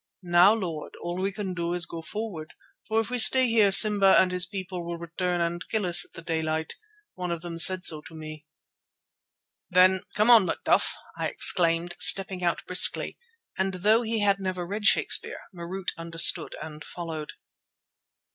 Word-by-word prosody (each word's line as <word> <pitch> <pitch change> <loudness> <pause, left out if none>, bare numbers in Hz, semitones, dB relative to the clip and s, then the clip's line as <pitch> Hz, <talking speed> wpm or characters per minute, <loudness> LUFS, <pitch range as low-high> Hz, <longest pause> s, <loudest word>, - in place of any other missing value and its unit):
"Now, 175 +4 +3
Lord, 170 -8 -7
all 175 +2 -6
we 195 +1 -2
can 195 -1 -7
do 170 -1 -4
is 175 -1 0
to 165 - -3
go 165 - -8
forward, 190 -4 -8 0.3
for 220 +1 -1
if 225 +1 -5
we 250 - -2
stay 260 +2 +5
here 220 -4 +2
Simba 200 -1 +5
and 185 - +1
his 180 0 0
people 185 -2 -7
will 170 0 -7
return 175 +1 -4
and 170 +1 -4
kill 220 -3 -2
us 175 +1 +5
at - - -14
the 170 - -12
daylight. 160 -1 -4 0.4
One 180 -1 -7
of 170 -1 -6
them 170 -1 -8
said 185 +1 +3
so 155 -2 +3
to 165 - -15
me." 155 -1 -11 1.2
"Then, 185 +1 +3
'come 215 +3 +2
on, 225 -5 +6
Macduff,'" - - -1 0.2
I - - -2
exclaimed, 170 0 +3
stepping 185 0 +3
out 170 -1 -3
briskly, 180 - +3 0.4
and 190 0 -2
though 210 +5 +1
he 225 -2 -3
had 200 -1 0
never 185 -2 -5
read 205 +4 -7
Shakespeare, - - 0
Marût 180 +2 -7
understood 165 0 +3
and 150 -1 -10
followed. 160 -3 -8
180 Hz, 175 wpm, -24 LUFS, 170-195 Hz, 1.2 s, on